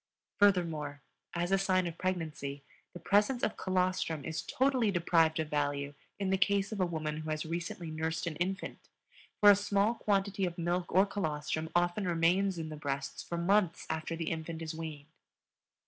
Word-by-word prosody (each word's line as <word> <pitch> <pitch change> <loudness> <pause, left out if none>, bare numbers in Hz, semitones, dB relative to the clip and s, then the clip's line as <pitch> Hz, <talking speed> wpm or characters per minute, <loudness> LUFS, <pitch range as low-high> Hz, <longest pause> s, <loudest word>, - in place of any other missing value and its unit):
Furthermore, 165 -8 +2 0.3
as 175 +2 -1
a 195 - +4
sign 185 -2 +2
of 170 -2 -4
pregnancy 155 -6 -3 0.3
the 175 - -9
presence 210 +8 +2
of - - +1
colostrum 185 -5 0
is 160 0 -3
totally 260 -4 +1
deprived 165 -3 +3
of 155 -1 -2
value 145 -1 -1 0.2
in 195 -1 -1
the 190 - +2
case 200 +1 +2
of 215 - -4
a 185 - +2
woman 155 -2 -3
who 155 0 -5
has 155 0 -2
recently 170 0 -4
nursed 160 +2 -2
an 165 -3 -3
infant, 190 +2 -3 0.5
for 205 -1 +9
a - - +7
small 205 +2 +2
quantity 200 -3 0
of 175 -2 -1
milk 175 +1 -1
or 190 +2 +5
colostrum 160 -5 -2
often 175 +3 +1
remains 175 +3 +2
in 160 -1 -4
the 155 - -6
breasts 140 -1 -3
for 170 - -5
months 180 0 +2
after 160 +1 -3
the 165 -1 -3
infant 160 0 -4
is 160 0 -4
weaned. 160 -3 -6
170 Hz, 180 wpm, -32 LUFS, 155-195 Hz, 0.5 s, for